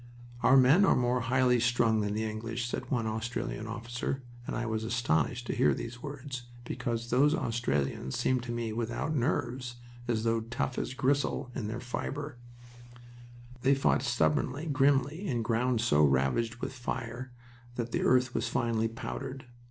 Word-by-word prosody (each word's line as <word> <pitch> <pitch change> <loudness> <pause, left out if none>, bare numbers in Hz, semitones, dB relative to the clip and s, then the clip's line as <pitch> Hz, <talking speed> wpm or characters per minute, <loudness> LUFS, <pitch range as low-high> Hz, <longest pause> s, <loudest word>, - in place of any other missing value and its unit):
"Our 135 - +6
men 135 +9 +6
are - - +5
more 125 0 +2
highly 125 0 +3
strung 115 -2 +3
than 105 0 -1
the 110 - 0
English," 115 +2 -3
said - - -4
one 120 -4 0
Australian 110 0 -3
officer, 120 +4 -4 0.2
and - - -3
I 120 - -1
was 110 -1 -1
astonished 110 - 0
to - - -2
hear 70 -2 +4
these 120 - -6
words, 135 -3 -6 0.2
because 120 -1 -3
those 145 +5 +4
Australians 70 - -1
seemed 130 -1 +1
to 120 - -4
me 115 -2 -2
without 120 +7 -2
nerves, 125 -2 -1 0.3
and 120 -2 +1
as 110 +1 -2 0.2
tough 130 +1 -2
as 130 - -3
gristle 135 -1 0
in 115 -5 -3
their 115 +3 -4
fiber. 140 +2 -4 1.2
They 135 +2 +4
fought 135 - +2
stubbornly, 130 +3 +1
grimly, 145 +4 +2
in 120 -7 0
ground 115 +1 +1
so 75 -11 +3
ravaged 70 - +2
with 120 - -5
fire 125 0 -4 0.4
that 120 -1 -3
the - - 0
earth 125 -1 +3
was - - 0
finely 115 -1 +1
powdered. 130 +3 -6
120 Hz, 160 wpm, -30 LUFS, 115-130 Hz, 1.2 s, Our